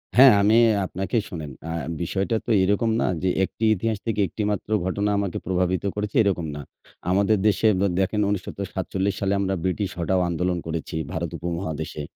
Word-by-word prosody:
হ্যাঁ 130 0 +9
আমি 110 +3 +4 0.3
আপনাকে 95 +6 -2
শোনেন 80 -6 -6 0.2
আ - - -3 0.3
বিষয়টা 95 +6 -1
তো - - -1
এরকম 105 +4 +2
না - - +1 0.2
যে, 95 - +2 0.2
একটি 110 - -9
ইতিহাস 110 +3 -1
থেকে 105 -2 0
একটি 105 +6 -4
মাত্র 105 0 -4 0.2
ঘটনা 100 +2 0
আমাকে 100 -3 -2
প্রভাবিত 90 -1 0
করেছে 105 0 -3
এরকম 90 -5 0
না। 75 - -5 0.5
আমাদের 100 +3 +3
দেশে 105 +2 +3
দ্যা 100 - +3
দেখেন 100 +2 +1
১৯৪৭ 95 0 -2
সালে 100 0 0
আমরা 95 -1 0
ব্রিটিশ 95 +1 -1
হঠাও 90 +2 +1
আন্দোলন 90 +1 0
করেছি 80 0 -4 0.2
ভারত 85 +1 -3
উপমহাদেশে। 80 -3 -4
95 Hz, 170 wpm, -24 LUFS, 90-105 Hz, 0.5 s, হ্যাঁ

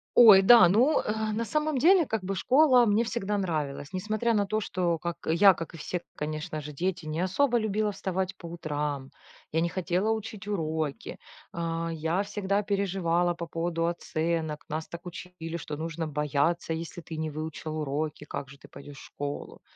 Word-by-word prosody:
Ой, 210 -5 +9
да. 210 -3 +9
Ну, 250 - +4
э, 215 0 -2
на 225 +2 -1
самом 305 +4 0
деле, 350 +3 +6
как 220 -6 -2
бы, 195 +1 -2
школа 255 0 +5
мне 215 +2 +3
всегда 210 -3 -2
нравилась. 155 -4 -3
Несмотря 215 +5 0
на 205 -1 +2
то, 215 +2 -1
что 175 -5 -1
как 170 0 -4
я, 185 +4 +6
как 165 +1 -7
и 165 - -9
все, 175 +3 -4
конечно 155 +1 -4
же, 150 +1 -7
дети 175 +2 -3
не 155 +1 -3
особо 240 +8 +2
любила 215 -1 0
вставать 190 0 -3
по 170 - -12
утрам, 150 -5 -3 0.4
я 160 - +1
не 170 - +1
хотела 185 +4 0
учить 220 -2 -5
уроки, 160 -7 -3 0.3
а, 165 0 -2
я 165 +3 -1
всегда 205 0 -1
переживала 180 -4 0
по 170 0 -6
поводу 165 0 -1
оценок. 160 -2 -2
Нас 155 +1 -3
так 170 +1 -9
учили, 170 -1 -7
что 150 -2 -6
нужно 165 0 -3
бояться, 150 +3 0
если 165 +1 -6
ты 160 -1 -8
не 155 0 -2
выучил 155 +1 -5
уроки, 150 +1 -3
как 135 - -6
же 140 0 -14
ты - - -15
пойдешь 140 0 -11
школу. 145 0 -6
170 Hz, 180 wpm, -28 LUFS, 155-205 Hz, 0.4 s, Ой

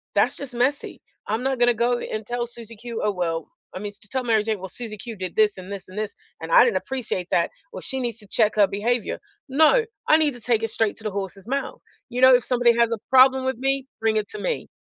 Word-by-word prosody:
That's - - +3
just 280 -3 -6
messy. 260 +4 -1 0.3
I'm 220 +3 -1
not 265 -1 0
gonna 240 0 +5
go 240 +2 +1
a - - -6
and 215 0 -4
tell 240 0 -2
Susie 230 -1 -10
Q, 235 +1 -6
"Oh, 210 - +2
well" 165 -4 -3 0.3
I - - -4
mean, 205 +1 -5
to - - -17
tell 260 +2 -2
Mary 225 -3 +2
Jane, 215 -2 -2
"Well, 190 0 -7
Susie 220 +1 -7
Q 230 +2 -7
did 185 -3 -6
this 215 -1 +3
and 185 +1 -9
this 195 -2 -6
and 185 - -11
this, 215 -1 -3 0.3
and - - -6
I - - +8
didn't 475 - +2
appreciate 225 -9 -3
that. 170 - +2 0.2
Well, - - -6
she 265 - -3
needs 240 -3 -2
to 205 - -13
check 215 +1 +2
her 210 -1 +6
behavior." 220 +5 -1 0.3
"No, 315 - +4 0.2
I 310 - +7
need 305 -3 +2
to 245 - -10
take 225 0 +1
it 225 - -1
straight 220 -2 0
to 220 - -12
the 215 - -1
horse's 195 0 -5
mouth. 275 +2 -3 0.3
You 250 - -3
know, 260 0 +8
if 245 - +2
somebody 245 -2 +3
has 235 -1 +3
a 230 - 0
problem 260 0 +6
with 260 -2 -1
me, 270 0 0
bring 220 -1 +2
it 215 - -1
to 425 - -7
me." - - -2
235 Hz, 265 wpm, -23 LUFS, 210-260 Hz, 0.3 s, I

